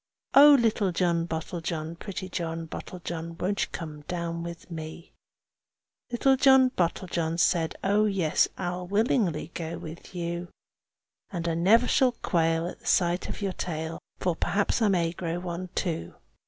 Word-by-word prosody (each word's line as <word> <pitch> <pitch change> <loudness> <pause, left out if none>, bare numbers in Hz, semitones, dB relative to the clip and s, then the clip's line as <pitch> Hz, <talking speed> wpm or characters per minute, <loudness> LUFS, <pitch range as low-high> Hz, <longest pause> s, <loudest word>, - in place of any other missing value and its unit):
Oh! 290 +1 +9
little 215 -4 +2
John 170 -1 +1
Bottlejohn, 165 0 -4
pretty 190 -2 -5
John 165 -2 -3
Bottlejohn, 170 -1 -6
Won't 200 +3 0
you - - -19
come 155 -3 -6
down 170 -1 -3
with 170 +1 -8
me?" 160 +1 -7 1.0
Little 265 +3 +3
John 265 0 +6
Bottlejohn 170 -3 -1
said, 165 -2 +2
"Oh 205 +2 +3
yes! 190 -7 +2
I'll 180 -1 -3
willingly 195 - +1
go 165 0 -4
with 160 +4 -10
you. 170 0 -3 0.8
And 170 -3 -3
I 165 - +1
never 210 +9 +4
shall 255 -2 +3
quail 165 -5 +1
at 175 - -6
the - - -12
sight 175 -1 +2
of - - -5
your 195 -2 -1
tail, 160 -2 -4 0.2
For 180 -2 0
perhaps 205 +7 0
I 220 - +4
may 175 -4 +2
grow 170 -1 -3
one 180 0 -5
too." 160 - -2
175 Hz, 155 wpm, -27 LUFS, 165-195 Hz, 1.0 s, Oh